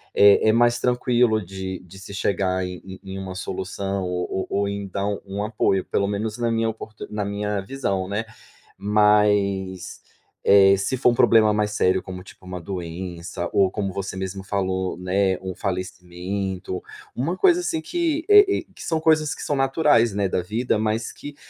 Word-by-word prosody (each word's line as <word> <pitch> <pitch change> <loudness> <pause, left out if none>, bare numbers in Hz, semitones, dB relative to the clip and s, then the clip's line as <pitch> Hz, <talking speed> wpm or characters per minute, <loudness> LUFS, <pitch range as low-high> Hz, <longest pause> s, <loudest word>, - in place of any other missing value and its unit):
é 100 +2 +6
é - - +7
mais 120 +1 +3
tranquilo 125 -2 +2
de 95 0 -6
de 90 +1 -14
se 100 +1 -9
chegar 95 -2 0
em 90 -1 -7
em 95 0 -10
em 95 - -5
uma 95 -1 -6
solução 95 +1 -3
o 90 +1 -3
o 100 - 0
ou 100 - 0
então 100 0 -3
um 100 +1 -4
apoio, 105 -3 +1
pelo 100 - 0
menos 105 +2 -3
na 120 -1 +1
minha 115 0 +1
oportu 110 -1 -8
na 105 -1 -2
minha 100 0 -2
visão, 95 -5 -2
né. 105 +3 -2 0.6
Mas, 100 -3 +2 0.4
eh, 100 -1 +7
se 100 +7 -1
for 125 -1 +4
um - - 0
problema 110 -2 +5
mais 105 0 0
sério, 95 -2 +1
como, 90 -1 -8
tipo, 95 - -16
uma 90 -1 -6
doença 85 -1 -5
ou 95 -1 +3
como 100 -1 -3
você 95 0 -5
mesmo 95 0 -4
falou, 95 -1 -2
né, 95 +1 +1
um 95 -1 -5
falecimento, 90 0 -4 0.3
uma 160 +9 -2
coisa 355 - +4
assim 335 -2 -2
que, 330 -2 -1
eh 415 0 +10 0.2
eh, - - -6
que - - -11
são 160 - 0
coisas 155 -2 +2
que - - -8
são 145 - -1
naturais, 135 -4 +3
né, 100 -1 0
da 90 - -1
vida, 110 +5 -1
mas 110 +1 -1
que 145 0 -10
100 Hz, 180 wpm, -23 LUFS, 95-110 Hz, 0.6 s, eh